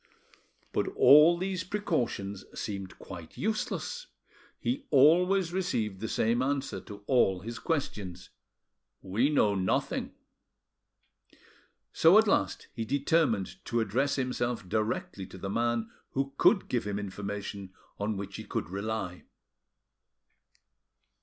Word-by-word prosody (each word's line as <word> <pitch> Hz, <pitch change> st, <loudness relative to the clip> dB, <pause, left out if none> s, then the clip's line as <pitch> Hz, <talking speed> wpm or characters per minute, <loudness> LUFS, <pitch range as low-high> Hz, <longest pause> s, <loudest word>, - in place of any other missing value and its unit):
But -, -, 0 dB
all 150 Hz, +4 st, +8 dB
these 185 Hz, 0 st, -2 dB
precautions 120 Hz, -, -2 dB, 0.2 s
seemed 100 Hz, -3 st, -5 dB
quite 85 Hz, -4 st, -10 dB
useless: 480 Hz, -, -2 dB, 0.5 s
he 275 Hz, +3 st, -2 dB
always 175 Hz, -, +4 dB
received 110 Hz, -, -1 dB
the 110 Hz, -, -3 dB
same 115 Hz, +3 st, +1 dB
answer 140 Hz, +1 st, -1 dB
to 100 Hz, -1 st, -11 dB
all 95 Hz, -8 st, +3 dB
his 115 Hz, +3 st, -6 dB
questions, 100 Hz, -, -3 dB, 0.7 s
"We 110 Hz, +9 st, +1 dB
know 110 Hz, -9 st, +3 dB
nothing." 95 Hz, -1 st, -1 dB, 1.8 s
So 165 Hz, +5 st, +6 dB
at 220 Hz, 0 st, +5 dB
last 95 Hz, -, +1 dB
he 115 Hz, -, -3 dB
determined 140 Hz, -, 0 dB
to 120 Hz, -, 0 dB
address 125 Hz, +6 st, +1 dB
himself 120 Hz, -5 st, -2 dB
directly 105 Hz, -2 st, -2 dB
to -, -, -11 dB
the 95 Hz, +1 st, -4 dB
man 115 Hz, 0 st, 0 dB, 0.2 s
who 135 Hz, 0 st, -1 dB
could 195 Hz, +6 st, +4 dB
give 120 Hz, -4 st, -1 dB
him 100 Hz, -1 st, -2 dB
information 100 Hz, -1 st, -5 dB, 0.3 s
on 105 Hz, 0 st, -1 dB
which 100 Hz, 0 st, -6 dB
he -, -, -6 dB
could -, -, -4 dB
rely. 100 Hz, -2 st, -3 dB
115 Hz, 120 wpm, -29 LUFS, 100-150 Hz, 1.8 s, all